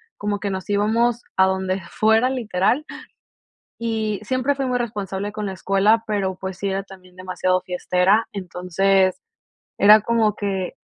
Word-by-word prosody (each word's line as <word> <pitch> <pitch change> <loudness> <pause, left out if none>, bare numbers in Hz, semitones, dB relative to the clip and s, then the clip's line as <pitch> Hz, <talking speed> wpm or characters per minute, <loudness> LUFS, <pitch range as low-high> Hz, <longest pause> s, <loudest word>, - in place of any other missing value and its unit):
como 205 0 -3
que 200 - -3
nos 190 +1 -5
íbamos 225 +4 +1
a 190 - +5
donde 190 0 -1
fuera, 220 +3 +3
literal. 245 +2 0 0.9
Y 220 -3 -2
siempre 255 +5 0
fui 275 -1 -2
muy 250 -1 0
responsable 205 -3 -4
con 210 -1 -4
la 195 - -3
escuela, 195 +4 +2
pero, 195 -3 -1
pues, 190 0 -6
sí 200 - -2
era 195 0 -2
también 185 -2 -16
demasiado 185 0 -1
fiestera. 180 +4 +1
Entonces, 190 - 0 0.6
era 210 +2 +8
como 220 -1 +1
que 195 -3 -3
200 Hz, 150 wpm, -22 LUFS, 190-220 Hz, 0.9 s, era